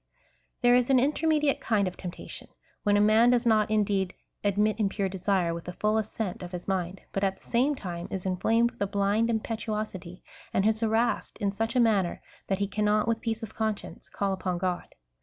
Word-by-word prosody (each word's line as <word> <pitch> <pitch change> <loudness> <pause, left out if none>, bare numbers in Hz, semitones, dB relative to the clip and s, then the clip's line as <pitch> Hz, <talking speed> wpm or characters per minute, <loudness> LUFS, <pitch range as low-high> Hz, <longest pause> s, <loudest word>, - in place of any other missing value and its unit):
There 245 0 +6
is 245 0 +3
an 265 - +5
intermediate 300 +2 +2
kind 205 -4 +1
of 180 - -4
temptation^ 180 -2 -8 0.2
— - - -37
when 205 -1 +3
a - - +4
man 215 +3 +5
does 245 -1 +3
not 215 -2 +3
indeed 200 -3 +1 0.3
admit 210 +1 +1
impure 200 -1 0
desire 185 -2 0
with 170 0 -6
the 180 - -5
full 210 +3 0
assent 215 -3 -4
of 180 0 -8
his 175 - -6
mind, 185 -1 -2
but 195 - -2
at 190 -1 0
the - - -22
same 260 +5 +2
time 175 -7 -6
is 190 -1 -5
inflamed 225 +6 +2
with - - -23
a 200 - +2
blind 205 +3 +1
im 220 -2 +1
petuosity, 215 -6 -5 0.3
and 195 - +3
is 220 0 +2
harassed 225 +1 0
in 200 -1 0
such 225 +4 -2
a - - +4
manner 210 -7 +2 0.3
that 195 - 0
he 200 +1 0
cannot 210 +2 +1
with 230 -1 0
i^eace 225 -1 -3
of 220 - -7
conscience 220 -2 -4
call 195 -1 -1
upon 185 -1 -2
God. 180 0 -3
210 Hz, 210 wpm, -28 LUFS, 190-225 Hz, 0.3 s, There